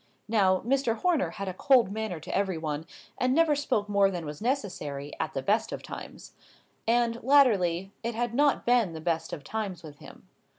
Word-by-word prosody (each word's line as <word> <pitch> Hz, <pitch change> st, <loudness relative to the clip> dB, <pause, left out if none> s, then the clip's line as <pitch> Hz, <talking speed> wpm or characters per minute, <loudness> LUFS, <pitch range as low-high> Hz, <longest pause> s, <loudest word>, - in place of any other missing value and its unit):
Now, 195 Hz, -4 st, +3 dB
Mr. 250 Hz, -2 st, +1 dB
Horner 335 Hz, +2 st, +1 dB
had 195 Hz, -1 st, -6 dB
a 185 Hz, -, -3 dB
cold 240 Hz, 0 st, +4 dB
manner 215 Hz, -5 st, -3 dB
to -, -, -5 dB
every 195 Hz, -3 st, 0 dB
one, 155 Hz, 0 st, -4 dB, 0.3 s
and 255 Hz, +1 st, +2 dB
never 325 Hz, -2 st, +4 dB
spoke 220 Hz, -7 st, -1 dB
more 200 Hz, -1 st, +3 dB
than 175 Hz, -4 st, -5 dB
was 150 Hz, 0 st, -7 dB
necessary, 175 Hz, -, -3 dB
at -, -, -3 dB
the 135 Hz, -, -2 dB
best 215 Hz, +2 st, +1 dB
of -, -, -6 dB
times. -, -, -9 dB, 0.5 s
And, 235 Hz, 0 st, +2 dB
latterly, 195 Hz, -10 st, +3 dB
it 235 Hz, 0 st, -3 dB
had 240 Hz, 0 st, -1 dB
not 285 Hz, +2 st, +2 dB
been 235 Hz, -7 st, +3 dB
the 160 Hz, -, -6 dB
best 165 Hz, 0 st, -2 dB
of 145 Hz, -, -6 dB
times 195 Hz, -1 st, -4 dB
with 150 Hz, -2 st, -11 dB
him. -, -, -14 dB
205 Hz, 195 wpm, -28 LUFS, 175-240 Hz, 0.5 s, cold